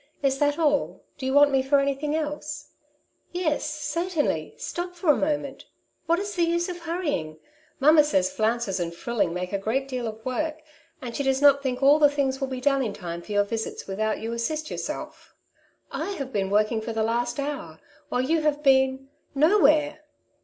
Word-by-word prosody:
'^Is 270 -1 +1
that 290 0 +2
all; 295 -3 +1 0.2
do 260 - -3
you 265 - 0
want 285 0 +7
me 270 -1 +3
for 275 +2 +3
anything 280 +2 -1
else? 300 -1 -4 0.3
" - - -43 0.3
"Yes, 335 -4 -1
certainly; 330 +2 -2
stop 355 +1 -5
for 345 -3 +3
a - - +3
moment; 290 -2 -2 0.4
what 335 +1 +3
is 405 +2 -3
the 350 - -1
use 340 0 +1
of 355 -1 -5
hurrying? 325 - -3 0.4
Mamma 300 +2 +6
says 190 -11 +1
flounces 220 -3 0
and 170 -1 -3
frilling 200 -2 -1
make 180 +2 -4
a 200 - 0
great 250 +7 -1
deal 250 -3 -3
of 220 - -4
extra 220 - -22
work, 310 +3 -2 0.4
and 235 -2 -5
she - - -1
does 270 -1 +1
not 280 -1 +6
think 260 -1 -2
all 285 +3 +6
the 295 -1 +6
things 275 -1 -1
will 270 - 0
be 260 -1 -4
done 275 +1 +2
in 220 -6 -2
time 170 -3 -6
for 210 - -11
your 205 0 +4
visits 220 +2 -4
without 215 +3 -1
you 225 +1 -4
assist 305 +7 -3
yourself. - - -6 0.6
I 400 - -3
have 275 -7 -6
been 195 -2 0
work 210 +1 +3
ing 225 -2 -1
for 225 +1 -4
the 220 0 0
last 240 +3 -1
hour, 275 - -4 0.3
while 250 - 0
you 315 +5 +1
have 300 -1 0
been 265 -1 +3
— - - -41
no 410 +6 +4
where." 300 -1 +3
275 Hz, 210 wpm, -25 LUFS, 230-300 Hz, 0.6 s, want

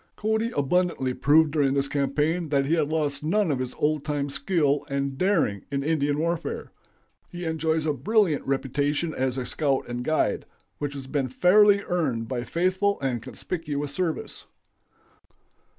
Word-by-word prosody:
Cody 220 +2 0
abundantly 145 -3 +1
proved 150 +3 +4
during 140 -3 +2
this 140 0 +1
campaign 150 +4 0
that 140 -2 +2
he 150 - +1
had 155 -3 +1
lost 150 -2 -1
none 175 +2 +1
of 135 - -1
his 130 -1 -4
old 150 -1 0
time 145 -2 -2
skill 145 -1 +1
and 140 0 -2
daring 165 - +1
in 140 -1 -2
Indian 145 -2 +1
warfare. 170 +1 -2 0.6
He 175 0 -6
enjoys 160 -1 0
a 150 - +1
brilliant 170 - +1
reputation 145 +4 0
as 130 0 -1
a 130 - -2
scout 140 +1 -1
and 120 0 -4
guide, 155 +4 0 0.3
which 145 -1 -3
has 135 -1 -6
been 135 -1 -1
fairly 200 +8 +5
earned 135 -11 -1
by 125 -1 -3
faithful 185 +5 +1
and 130 -4 -1
conspicuous 145 +1 -4
service. 170 0 -3
145 Hz, 155 wpm, -25 LUFS, 140-170 Hz, 0.6 s, fairly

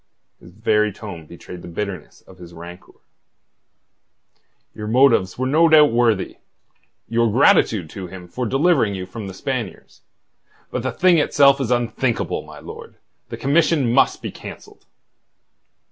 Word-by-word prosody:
His - - -15
very 105 0 0
tone 90 -6 -10
betrayed 85 +1 -11
the - - -11
bitterness 95 -1 -6
of 95 -2 -18
his 85 -1 -12
rancour. 85 +2 -12 1.8
"Your 105 - -7
motives 110 -6 +3
were 130 - -2
no 160 +5 +3
doubt 150 -2 +6
worthy... 115 -4 0 0.7
your 115 +1 +1
gratitude 110 - +3
to 95 -2 -7
him 90 0 -11
for 125 +7 -4
delivering 135 - +2
you 95 -1 -5
from 110 +1 -8
the 95 - -8
Spaniards. 120 -2 -6 0.7
But 125 - -3
the 130 +1 -2
thing 175 +5 +3
itself 140 -1 +4
is 125 - -2
unthinkable, 120 0 -1
my - - -13
lord. - - -11 0.3
The - - -6
commission 145 -3 +1
must - - +2
be - - -4
cancelled." - - -12
115 Hz, 145 wpm, -20 LUFS, 95-135 Hz, 1.8 s, doubt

